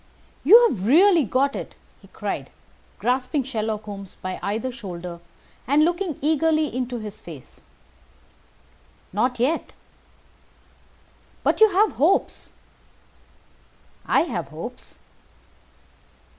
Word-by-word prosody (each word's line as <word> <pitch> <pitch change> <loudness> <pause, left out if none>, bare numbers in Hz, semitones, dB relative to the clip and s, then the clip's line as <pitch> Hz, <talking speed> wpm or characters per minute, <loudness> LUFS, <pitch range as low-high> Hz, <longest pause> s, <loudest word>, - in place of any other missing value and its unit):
"You 460 - +8
have 190 - -4
really 335 - +5
got 270 +6 +1
it?" - - -7 0.3
he - - -17
cried, - - -5 0.5
grasping 255 +3 0
Sherlock 220 -4 -3
Holmes 200 -3 -9
by 185 0 -5
either 220 +6 -2
shoulder, 180 -7 -8 0.5
and 290 +4 +4
looking 345 -2 -1
eagerly 310 -1 +1
into 250 -1 -2
his 215 -2 -8
face. 150 -7 -12 1.5
"Not 245 +4 0
yet." 285 +7 0 1.7
"But - - +1
you 440 - +8
have 405 +3 +2
hopes?" 355 +6 +1 1.6
"I - - +4
have - - -3
hopes." - - -9
255 Hz, 105 wpm, -23 LUFS, 215-320 Hz, 1.7 s, You